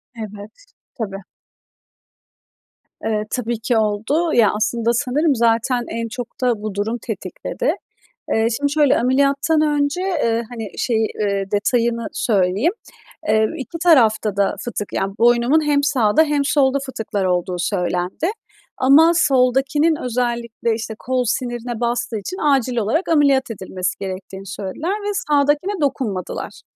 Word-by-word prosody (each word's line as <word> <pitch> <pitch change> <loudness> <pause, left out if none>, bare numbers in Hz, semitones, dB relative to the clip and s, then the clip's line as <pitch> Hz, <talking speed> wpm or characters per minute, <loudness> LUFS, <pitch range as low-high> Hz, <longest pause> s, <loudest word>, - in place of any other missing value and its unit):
Evet. 215 - -9 0.3
Tabii. 195 -5 -4 1.9
Eee, 215 -1 0
tabi 235 -2 -2
ki 225 +1 0
oldu. 220 +11 0
Ya, 225 -4 +5
aslında, 230 +2 0
sanırım, 285 +4 +1
zaten 235 +1 +1
en 230 +1 -3
çok 240 +2 -8
da 240 -4 +1
bu 215 -2 -5
durum 215 +4 -1
tetikledi. - - -3 0.6
Eee, 220 +1 +2
şimdi, 285 0 -1
şöyle 295 -2 +4
ameliyattan 275 +5 +2
önce, 295 +1 +1
eee, 235 -12 0
hani, 225 -4 -6
şeyi, 225 -3 +1
eee, 200 -2 0
detayını 235 +2 +1
söyleyeyim, 200 - +1 0.6
eee, 220 0 +4
2 315 +4 -6
tarafta 220 - +4
da 200 -1 +1
fıtık 210 -4 -5
yani 195 0 -2
boynumun 240 +6 +3
hem 290 -1 +3
sağda 270 -3 +3
hem 290 -2 0
solda 275 -1 +2
fıtıklar 215 -6 -3
olduğu 180 0 0
söylendi 180 - -1 0.5
ama 300 +6 +6
soldakinin 275 +2 +3
özellikle, 235 -2 -1
işte, 220 0 -5
kol 255 0 -1
sinirine 240 -1 -3
bastığı 235 -2 -1
için 365 - -6
acil 270 -4 +1
olarak 235 - 0
ameliyat 280 -5 +3
edilmesi 185 -3 -4
gerektiğini 190 0 -6
söylediler 200 - -4
ve 415 0 -2 0.2
sağdakine 295 +6 +2
dokunmadılar. 245 -10 -3
240 Hz, 130 wpm, -20 LUFS, 215-280 Hz, 1.9 s, ama